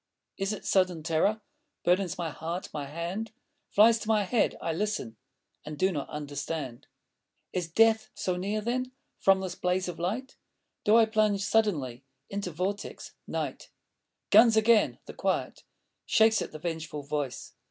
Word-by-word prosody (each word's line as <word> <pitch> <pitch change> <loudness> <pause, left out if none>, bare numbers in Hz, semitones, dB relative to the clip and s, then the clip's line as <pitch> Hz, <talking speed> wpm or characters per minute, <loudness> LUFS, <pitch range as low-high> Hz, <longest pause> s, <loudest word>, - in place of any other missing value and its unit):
Is 195 +1 -1
it 210 - -6
sudden 185 -4 +2
terror 170 +7 +1 0.4
Burdens 180 0 +2
my 170 -3 -3
heart? 165 +4 -5
My 145 -2 -4
hand 175 +9 -4 0.4
Flies 225 +2 +6
to - - -7
my 215 -2 +3
head. 220 +4 +1
I 165 - -2
listen.... 205 - -2 0.5
And 150 0 -7
do 190 +5 +2
not 145 -5 -4
understand. 145 -3 -5 0.7
Is 180 -2 -1
death 220 +5 +3
so 185 - -1
near, 200 +4 -2
then? 255 +3 -2 0.3
From 195 0 +4
this 190 -2 -3
blaze 180 +1 0
of 175 - -6
light 225 +10 -3 0.5
Do 210 - +5
I 230 - +7
plunge 215 -2 +1
suddenly 145 - +1 0.3
Into 200 -2 -3
Vortex? 185 +5 -4
Night? - - -4 0.6
Guns 220 +1 +7
again! 220 0 +4
the - - -9
quiet - - -2 0.4
Shakes 220 0 +4
at - - -4
the 155 - -7
vengeful 160 -3 -4
voice.... 145 -2 -4
185 Hz, 150 wpm, -29 LUFS, 160-215 Hz, 0.7 s, I